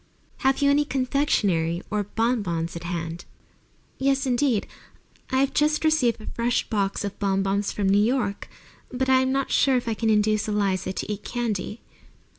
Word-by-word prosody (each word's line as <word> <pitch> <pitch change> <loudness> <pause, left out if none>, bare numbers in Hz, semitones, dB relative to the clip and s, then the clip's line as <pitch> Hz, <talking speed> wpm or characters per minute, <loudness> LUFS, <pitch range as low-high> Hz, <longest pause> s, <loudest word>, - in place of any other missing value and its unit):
Have 265 +1 +1
you 280 - +5
any 290 +1 +3
confectionery 215 - 0
or 210 0 +1
bon 230 +3 0
bons 170 -3 -3
at 170 0 -7
hand?" 170 -1 -4 0.7
"Yes, 275 +1 +1
indeed. 250 -3 +1 0.6
I 260 - 0
have 275 - +1
just 305 +1 +2
received 270 -8 +2
a 215 - -11
fresh 235 0 -1
box 200 -2 0
of 200 - -6
bon 195 -1 +1
bons 200 +1 0
from 200 -2 -1
New 200 +2 +4
York. 225 -4 -1 0.4
But 260 +1 -1
I'm 260 0 +4
not 270 0 -1
sure 265 -2 +3
I 230 - -1
can 225 +1 -1
induce 215 0 +2
Eliza 195 -3 0
to 190 - -4
eat 205 - -8
candy." 225 -3 -3
220 Hz, 170 wpm, -25 LUFS, 195-260 Hz, 0.7 s, you